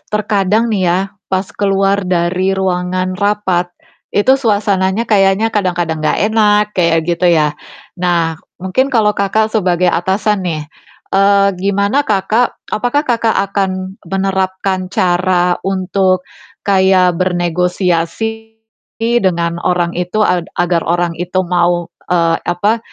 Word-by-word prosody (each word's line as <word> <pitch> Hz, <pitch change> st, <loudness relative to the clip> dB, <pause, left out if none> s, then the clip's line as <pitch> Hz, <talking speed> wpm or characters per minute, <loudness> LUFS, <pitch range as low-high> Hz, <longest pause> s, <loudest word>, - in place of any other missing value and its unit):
terkadang 210 Hz, +1 st, +1 dB
nih 190 Hz, -4 st, +1 dB
ya, 175 Hz, +2 st, +2 dB, 0.3 s
pas 190 Hz, 0 st, 0 dB
keluar 195 Hz, 0 st, +1 dB
dari 185 Hz, +2 st, 0 dB
ruangan 185 Hz, 0 st, -1 dB
rapat, 200 Hz, -3 st, 0 dB, 0.5 s
itu 205 Hz, +6 st, +4 dB
suasananya 205 Hz, -2 st, +1 dB
kayaknya 205 Hz, 0 st, +2 dB
kadang-kadang 175 Hz, -5 st, -1 dB
nggak 155 Hz, -, 0 dB
enak, 210 Hz, -1 st, +4 dB
kayak 170 Hz, -3 st, +1 dB
gitu 175 Hz, +1 st, 0 dB
ya? 155 Hz, -3 st, +3 dB, 0.5 s
Nah, 170 Hz, -3 st, 0 dB, 0.2 s
mungkin 190 Hz, +9 st, 0 dB
kalau 220 Hz, -5 st, +2 dB
Kakak, 215 Hz, +2 st, 0 dB
sebagai 180 Hz, -4 st, +2 dB
atasan 195 Hz, +4 st, 0 dB
nih, 155 Hz, -2 st, -3 dB, 0.5 s
eee, 200 Hz, 0 st, +4 dB
gimana 200 Hz, +8 st, 0 dB
Kakak 215 Hz, +4 st, +1 dB, 0.2 s
apakah 245 Hz, +7 st, 0 dB
Kakak, 230 Hz, -4 st, +1 dB, 0.2 s
akan 190 Hz, -1 st, -2 dB
menerapkan 190 Hz, 0 st, -1 dB
cara 180 Hz, -1 st, +1 dB
untuk 185 Hz, -1 st, 0 dB, 0.4 s
kayak 190 Hz, -3 st, +3 dB
bernegosiasi 180 Hz, +5 st, -1 dB, 0.6 s
dengan 170 Hz, -3 st, 0 dB
orang 180 Hz, -1 st, +1 dB
itu, 180 Hz, +5 st, -1 dB
ad 180 Hz, -3 st, 0 dB
agar 175 Hz, -1 st, +1 dB
orang 175 Hz, 0 st, +1 dB
itu 180 Hz, +2 st, -1 dB
mau, 175 Hz, -1 st, 0 dB, 0.2 s
eee, 165 Hz, -2 st, +2 dB
apa, 200 Hz, +6 st, +1 dB
190 Hz, 120 wpm, -15 LUFS, 175-205 Hz, 0.6 s, itu